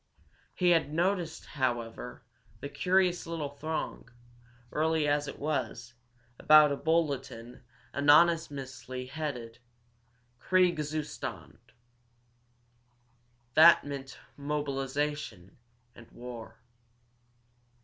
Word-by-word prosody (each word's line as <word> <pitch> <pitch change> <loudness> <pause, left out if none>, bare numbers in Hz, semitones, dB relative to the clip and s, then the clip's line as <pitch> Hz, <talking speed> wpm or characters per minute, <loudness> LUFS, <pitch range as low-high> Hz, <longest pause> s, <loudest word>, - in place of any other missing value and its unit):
He 180 -1 +3
had 165 -4 +2
noticed, 175 0 -1
however, 125 -2 -3 0.4
the 140 - -6
curious 180 +4 +1
little 165 -4 -3
throng, 155 -3 -5 0.6
early 160 0 +1
as 145 0 +1
it - - -7
was, 140 -4 -3 0.5
about 155 -1 +7
a - - +1
bulletin 140 -7 -2 0.3
ominously 140 -4 +2
headed, 125 -5 -5 0.8
"Kriegzustand!" 155 -3 -1 1.9
That 165 +4 +8
meant 135 -1 -7 0.2
mobilization 140 -6 -3 0.4
and 120 - -15
war. 115 -2 -9
145 Hz, 75 wpm, -30 LUFS, 130-160 Hz, 1.9 s, That